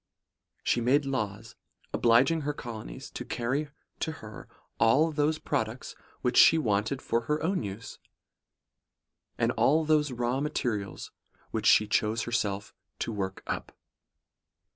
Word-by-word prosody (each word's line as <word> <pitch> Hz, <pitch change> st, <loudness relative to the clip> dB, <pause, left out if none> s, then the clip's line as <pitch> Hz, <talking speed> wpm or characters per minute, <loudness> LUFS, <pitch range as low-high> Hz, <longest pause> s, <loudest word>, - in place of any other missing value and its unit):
She 120 Hz, -, +1 dB
made 135 Hz, +5 st, +3 dB
laws, 110 Hz, -5 st, -3 dB, 0.4 s
obliging 130 Hz, +8 st, +4 dB
her 145 Hz, 0 st, -2 dB
colonies 120 Hz, +1 st, -8 dB
to -, -, -6 dB
carry 130 Hz, +5 st, -2 dB, 0.3 s
to 160 Hz, -, -2 dB
her 110 Hz, -8 st, -10 dB, 0.3 s
all 140 Hz, +9 st, +4 dB
those 150 Hz, +1 st, +1 dB
products 125 Hz, -5 st, -3 dB, 0.3 s
which 125 Hz, -, +1 dB
she 165 Hz, -, +8 dB
wanted 110 Hz, -1 st, 0 dB
for 115 Hz, -, +1 dB
her 150 Hz, +4 st, 0 dB
own 185 Hz, +3 st, +1 dB
use; 105 Hz, +1 st, -7 dB, 1.4 s
and -, -, +2 dB
all 155 Hz, +3 st, +3 dB
those 150 Hz, -2 st, +2 dB
raw 120 Hz, +1 st, -1 dB
materials 120 Hz, -9 st, -3 dB, 0.4 s
which -, -, -1 dB
she 105 Hz, -, +6 dB
chose 110 Hz, +1 st, +1 dB
herself 105 Hz, -4 st, -2 dB, 0.2 s
to -, -, -3 dB
work 95 Hz, -3 st, -4 dB
up. -, -, -4 dB
120 Hz, 130 wpm, -29 LUFS, 110-145 Hz, 1.4 s, she